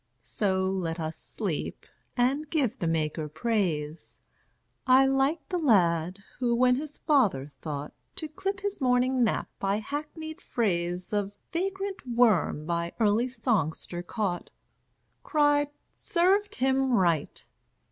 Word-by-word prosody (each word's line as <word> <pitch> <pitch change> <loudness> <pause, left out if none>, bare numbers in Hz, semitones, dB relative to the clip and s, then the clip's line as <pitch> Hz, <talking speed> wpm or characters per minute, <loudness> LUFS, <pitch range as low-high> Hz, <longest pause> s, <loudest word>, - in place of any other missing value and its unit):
So 190 - 0
let 180 -3 -2
us 160 0 -3
sleep, - - -4 0.3
and 275 +5 +1
give 270 -6 0
the 170 - -1
Maker 155 -1 -1
praise. 160 -4 -2 0.7
I 260 +1 +7
like 270 +4 +1
the 360 - 0
lad 185 - +2 0.2
who, 240 -2 +2
when 250 +1 +4
his 295 +1 -6
father 220 - +2
thought 145 0 -6 0.2
To 315 - -4
clip 385 +6 -4
his 405 -4 -3
morning 250 0 +3
nap 225 - 0
by 195 +1 +1
hackneyed 310 - -6
phrase 180 -4 -1
Of 205 -1 0 0.2
vagrant 385 +2 -2
worm 225 -10 +3
by 170 0 -2
early 220 +2 +3
songster 220 - -1
caught, 180 -1 -3 0.7
Cried, 290 -1 +2 0.2
"Served 395 +4 +1
him 265 0 +2
right! 170 -8 +1
235 Hz, 125 wpm, -28 LUFS, 175-290 Hz, 0.7 s, I